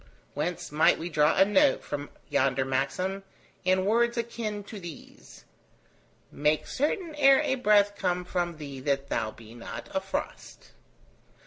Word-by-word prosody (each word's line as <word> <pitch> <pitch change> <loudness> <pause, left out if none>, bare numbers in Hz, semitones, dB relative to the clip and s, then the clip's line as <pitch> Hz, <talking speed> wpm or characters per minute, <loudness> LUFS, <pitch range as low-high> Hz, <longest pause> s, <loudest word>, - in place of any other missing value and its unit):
Whence 160 +3 -3
might 155 +2 +4
we 170 +2 -5
draw 150 -1 +3
a 190 - +7
note 280 +8 +3
upon 145 0 -5 0.2
yonder 130 0 +1
maxim, 140 +9 -1 0.4
in 185 0 +2
words 235 +3 +2
akin 225 -3 -3
to 210 +1 -9
these: 170 -4 -12 0.9
Make 150 +1 +1
certain 315 - -2
ere 275 -2 +5
a - - +1
breath 210 -5 +3
come 180 -2 -1
from 175 -2 -2
thee 140 -3 -7
that 140 0 -1
thou 110 - -1
be 110 0 -13
not 120 -1 -8
a - - +1
frost. - - -6
180 Hz, 145 wpm, -28 LUFS, 145-215 Hz, 0.9 s, a